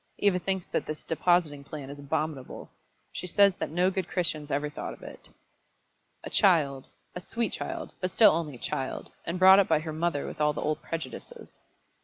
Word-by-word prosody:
Eva 195 -3 +2
thinks 190 0 -2
that - - -2
this 155 0 -5
depositing 160 -3 +1
plan 140 -1 -8
is 145 - -10
abominable. 150 -1 -4 0.4
She 180 - -5
says 200 +2 +5
that - - -2
no 180 +4 +2
good 185 -2 -2
Christians 155 -5 -2
ever 145 +1 0
thought 150 - -6
of - - -18
it." - - -11 0.9
"A - - -6
child 150 -9 +3 0.3
a 180 - -6
sweet 230 +4 -2
child 335 -2 -5
but 185 - 0
still 215 +4 +6
only 155 -4 -2
a - - -10
child; 130 +2 -4 0.2
and 170 +2 -2
brought 190 +1 +8
up 200 - +4
by 160 - +4
her 155 -1 -5
mother 160 -2 -1
with 155 - -6
all 150 0 +3
the - - -4
old 155 0 -1
prejudices." 155 -7 -7
160 Hz, 195 wpm, -28 LUFS, 150-185 Hz, 0.9 s, brought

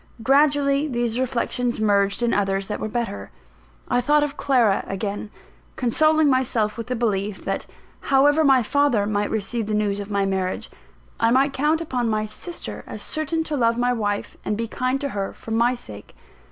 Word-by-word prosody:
Gradually 280 +2 +3
these 240 -3 -1
reflections 245 -1 -1
merged 200 +1 +2
in 235 - +2
others 195 -1 0
that 210 - -4
were - - -3
better. 215 - -4 0.6
I 245 - +2
thought 295 +4 +3
of 290 -1 -3
Clara 250 -8 +2
again; 200 +2 -4 0.5
consoling 310 +5 +3
myself 245 -5 +1
with 230 0 -6
the 250 - -2
belief, 210 -4 -2
that, - - -2 0.4
however 290 +3 +4
my 265 -4 +5
father 265 -4 +2
might 205 0 -1
receive 220 +1 -2
the 215 - -1
news 205 -1 0
of 200 0 -6
my 200 -1 +1
marriage, 190 -1 -2 0.5
I 230 - +3
might 270 +3 +3
count 305 +4 +1
upon 250 -7 -1
my 215 0 0
sister 335 +11 -7
as - - -7
certain 310 +1 -1
to 310 -2 -3
love 230 -3 +2
my 245 0 +2
wife 205 -3 -2
and 210 - -2
be 230 0 -2
kind 255 +4 -1
to 280 - -2
her, 200 -4 -3
for 225 - -10
my 235 +3 +2
sake. 105 - -11
235 Hz, 180 wpm, -23 LUFS, 210-275 Hz, 0.6 s, my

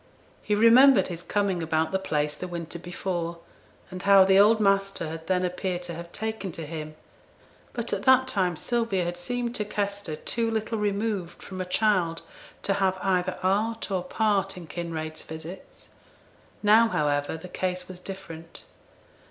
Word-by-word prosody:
He 210 - 0
remembered 230 0 +7
his 170 -1 -5
coming 195 -2 0
about 160 0 0
the 190 - +1
place 150 -5 -1
the 180 - -6
winter 170 -1 -6
before, 175 -1 -3 0.5
and 185 0 -6
how 195 -1 +7
the 190 0 +5
old 215 +2 +6
master 195 -4 +1
had 160 0 -7
then 185 -1 +2
appeared 180 0 -3
to 175 -1 -5
have 170 +1 -8
taken 220 -2 -4
to 160 - -4
him; 155 0 -6 0.8
but 235 -1 -3
at 200 - -1
that 260 +2 +5
time 185 -7 0
Sylvia 230 -1 0
had 175 0 -2
seemed 240 +7 -3
to 215 - -1
Kester 200 -5 -3
too 230 +8 -1
little 220 0 -2
removed 205 -3 -2
from 185 -1 -6
a - - -2
child 180 -4 +1 0.4
to 200 - +1
have 190 -1 +1
either 185 -1 +1
art 215 +4 0
or 185 -2 0
part 195 0 0
in 175 - -8
Kinraid's 160 -1 -5
visits; 160 +4 -10 0.7
now, 220 +3 +6
however, 145 -5 0
the 185 - -10
case 180 0 -3
was 185 -1 -9
different. 165 -4 -9
185 Hz, 165 wpm, -26 LUFS, 170-205 Hz, 0.8 s, remembered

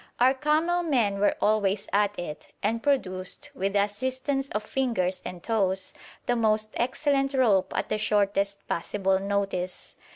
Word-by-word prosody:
Our 255 +2 +5
camel 310 +6 +1
men 235 - +1
were 205 - +3
always 205 -2 +1
at 205 0 +2
it, 155 -4 -6 0.2
and 225 +3 0
produced, 245 -2 -1
with 200 -7 -2
the 200 -1 +4
assistance 260 +6 -2
of 210 - -2
fingers 215 -7 -1
and 180 -1 -7
toes, 190 -4 0 0.3
the 245 - +1
most 215 -1 +1
excellent 275 +2 +1
rope 215 -8 +3
at - - -1
the 215 - 0
shortest 200 -1 +1
possible 190 +2 0
notice. 195 -2 -2
210 Hz, 150 wpm, -27 LUFS, 195-260 Hz, 0.3 s, Our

